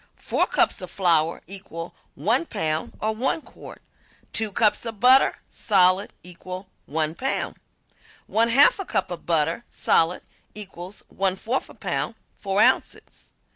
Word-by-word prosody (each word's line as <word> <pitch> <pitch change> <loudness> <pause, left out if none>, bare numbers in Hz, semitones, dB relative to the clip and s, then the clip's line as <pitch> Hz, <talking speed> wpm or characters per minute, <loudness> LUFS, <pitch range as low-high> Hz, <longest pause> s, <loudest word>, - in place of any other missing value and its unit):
Four - - 0
cups - - +1
of - - -6
flour 165 -3 +1
equal 175 -3 -7 0.2
1 230 - +1
pound 155 -6 -2
or 220 +1 0
1 265 +7 -1
quart. - - -13 0.5
Two 220 -2 -1
cups 210 +1 +2
of 225 -3 -6
butter, 255 +3 +5
solid, 190 -1 +2
equal 185 +2 -8 0.2
1 155 +1 -1
pound. 265 +10 -2 0.7
One 230 +1 +2
half 275 +5 +6
cup 190 - -1
of 175 - -7
butter, 165 +5 +1
solid, 165 +2 +1 0.3
equals 190 -2 -8
1/4 195 +6 -2
pound - - -2 0.2
4 195 0 +1
ounces. - - 0
195 Hz, 130 wpm, -24 LUFS, 170-220 Hz, 0.7 s, half